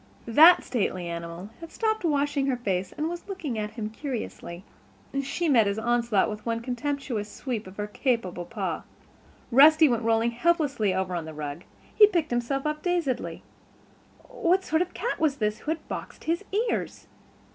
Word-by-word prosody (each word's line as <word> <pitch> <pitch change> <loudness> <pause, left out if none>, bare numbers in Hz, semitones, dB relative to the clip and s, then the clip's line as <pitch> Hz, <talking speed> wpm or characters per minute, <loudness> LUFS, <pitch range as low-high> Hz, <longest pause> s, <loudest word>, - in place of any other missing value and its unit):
The 315 +10 +8
stately 190 -7 -2
animal 170 +3 -6
had 330 -1 -10
stopped 440 -2 -1
washing 285 -3 +1
her 260 -2 +1
face 190 -5 -2
and 305 - -3
was 345 +2 -6
looking 305 - -4
at 210 0 -2
him 215 -2 -4
curiously. 220 - -6 0.6
She 275 +5 -2
met 235 -8 +5
his 200 +1 -1
onslaught 235 -3 +2
with 210 0 -6
one 230 -1 -2
contemptuous 245 -3 -3
sweep 230 -5 -4
of 185 - -12
her 205 - -2
capable 210 -5 -1
paw. - - -3 0.7
Rusty 310 +5 +7
went 240 -4 +1
rolling 225 +1 +2
helplessly 280 - +1
over 185 0 -1
on 170 -2 -3
the 160 -1 -8
rug; 150 +3 -6 0.3
he 420 - +8
picked 340 -8 -1
himself 240 +4 -1
up 300 0 -2
dazedly. 345 -8 -1 0.8
What 380 -6 +1
sort 320 +2 +1
of 360 - 0
a - - -25
cat - - -3
was 305 -4 +2
this 210 -3 -1
who - - -7
had 320 +1 -3
boxed - - -7
his 335 +4 -1
ears? 445 +3 -1
245 Hz, 175 wpm, -26 LUFS, 210-315 Hz, 0.8 s, The